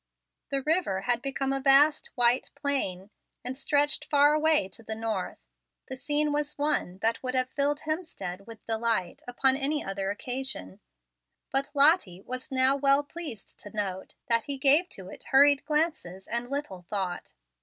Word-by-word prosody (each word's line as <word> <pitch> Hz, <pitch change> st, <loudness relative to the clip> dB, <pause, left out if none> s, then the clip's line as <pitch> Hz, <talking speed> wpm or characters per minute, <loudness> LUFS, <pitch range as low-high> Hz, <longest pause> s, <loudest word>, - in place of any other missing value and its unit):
The 275 Hz, -1 st, -2 dB
river 305 Hz, -, 0 dB
had 240 Hz, +3 st, 0 dB
become 270 Hz, 0 st, -2 dB
a 270 Hz, -, -1 dB
vast, 280 Hz, +3 st, +5 dB
white 245 Hz, 0 st, +2 dB
plain, 220 Hz, -10 st, -2 dB, 0.3 s
and 255 Hz, +1 st, -4 dB
stretched 290 Hz, +2 st, +1 dB
far 290 Hz, 0 st, +4 dB
away 305 Hz, -8 st, +2 dB
to 195 Hz, -, -11 dB
the 220 Hz, 0 st, -6 dB
north. 220 Hz, -4 st, -3 dB, 0.5 s
The 260 Hz, -, -4 dB
scene 295 Hz, +3 st, 0 dB
was 295 Hz, 0 st, -2 dB
one 290 Hz, -11 st, -1 dB
that 225 Hz, +1 st, +1 dB
would 255 Hz, 0 st, -3 dB
have 255 Hz, 0 st, 0 dB
filled 290 Hz, +1 st, -1 dB
Hemstead 310 Hz, -, -5 dB
with 225 Hz, -2 st, -13 dB
delight 225 Hz, -5 st, -1 dB
upon 260 Hz, +2 st, +3 dB
any 295 Hz, +2 st, -1 dB
other 195 Hz, 0 st, -3 dB
occasion, 245 Hz, -, -5 dB, 0.7 s
but 270 Hz, +1 st, 0 dB
Lottie 280 Hz, -, +4 dB
was 255 Hz, +3 st, -6 dB
now 260 Hz, 0 st, +3 dB
well 280 Hz, +1 st, +3 dB
pleased 290 Hz, -, -8 dB
to 205 Hz, +1 st, -10 dB
note 190 Hz, -2 st, -4 dB
that 230 Hz, -1 st, +2 dB
he 280 Hz, -1 st, -3 dB
gave 290 Hz, +6 st, +5 dB
to 190 Hz, -2 st, -9 dB
it -, -, -12 dB
hurried 285 Hz, +1 st, +5 dB
glances 300 Hz, -, -1 dB
and 235 Hz, +1 st, -3 dB
little 280 Hz, -10 st, -4 dB
thought. 190 Hz, -4 st, -4 dB
265 Hz, 165 wpm, -27 LUFS, 220-290 Hz, 0.7 s, vast